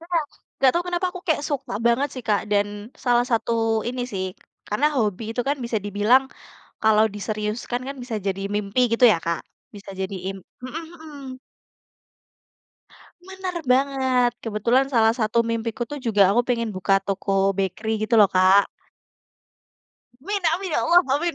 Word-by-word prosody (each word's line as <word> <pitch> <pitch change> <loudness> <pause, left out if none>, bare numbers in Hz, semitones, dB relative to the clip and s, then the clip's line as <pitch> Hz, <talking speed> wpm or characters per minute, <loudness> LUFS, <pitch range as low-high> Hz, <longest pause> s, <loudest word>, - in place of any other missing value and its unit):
Ya. 335 - -14 0.5
Nggak 265 -1 +5
tau 345 - +1
kenapa 355 +1 -1
aku 365 0 -8
kayak 305 -2 +2
suka 275 -5 -3
banget, 245 +5 +2
sih, 255 - -6
Kak, 205 -1 +2
dan 205 0 +3 0.4
salah 245 -1 +3
satu 230 0 +1 0.4
ini, 250 0 -3
sih, 190 -1 -2
k - - -34 0.3
karena 215 +8 +1
hobi 215 -2 0
itu, 245 - -2
kan, 285 - +1
bisa 235 -2 -1
dibilang 210 +6 +3 0.6
kalau 215 0 +5
diseriuskan, 215 +4 -3
kan, 275 - -6
bisa 235 -3 -4
jadi 195 0 -2
mimpi, 210 +4 -1
gitu, 230 +2 +4
ya, 170 - 0
Kak. 170 -1 -2 0.3
Bisa 200 -1 -10
jadi 190 +1 -3 0.2
im 195 - -10 0.3
mhm 305 +6 -5
mhm. 285 -5 -10 1.9
Benar 380 -1 -5
banget. 260 -1 +2
Kebetulan 230 +5 +1
salah 225 -5 +3
satu 230 -1 +1
mimpiku, 230 +1 -3
tuh, 290 +5 -5
juga 210 -7 +3
aku 240 +3 +2
pengen 235 -2 -1
buka 195 0 +1
toko 195 0 0
bakery, 215 +3 -2
gitu, 235 - +1
loh, 210 -3 +6
Kak. 190 +2 +5 1.5
Amin 400 +6 -3
amin, 370 +1 -4
ya - - +1
Allah, 350 +1 +5
amin. 340 +4 -1
235 Hz, 160 wpm, -23 LUFS, 205-270 Hz, 1.9 s, loh